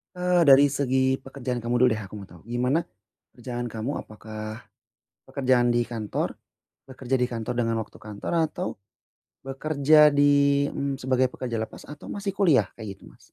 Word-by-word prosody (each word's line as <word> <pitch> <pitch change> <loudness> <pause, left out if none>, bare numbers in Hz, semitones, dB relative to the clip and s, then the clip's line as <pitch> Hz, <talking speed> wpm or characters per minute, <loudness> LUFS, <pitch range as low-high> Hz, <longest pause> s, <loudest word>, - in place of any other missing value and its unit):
Eee, 180 -1 +2
dari 140 0 +7
segi 130 -1 +1
pekerjaan 125 -3 -5
kamu 120 +1 -1
dulu 125 0 +6
deh, 110 - -5
aku 100 - -12
mau 100 - -10
tau, 85 -1 -16
gimana 125 +8 0 0.5
pekerjaan 120 0 -5
kamu, 115 +4 -4
apakah 110 +1 -8 0.6
pekerjaan 125 -3 +2
di 120 0 +1
kantor, 110 -3 -3 0.5
bekerja 130 -1 -3
di 125 - +1
kantor 115 +1 -3
dengan 115 -1 0
waktu 110 - -7
kantor 105 -1 -7 0.2
atau 180 - -3 0.8
bekerja 150 +2 +4
di, 140 0 +4
mmm, 140 -1 -2
sebagai 130 -1 +1
pekerja 120 -3 -4
lepas, 110 - -7
atau 150 0 -11
masih 200 -1 -3
kuliah? 160 - +3
Kayak 105 -4 -8
gitu, - - -27
Mas. - - -22
130 Hz, 160 wpm, -25 LUFS, 115-140 Hz, 0.8 s, dari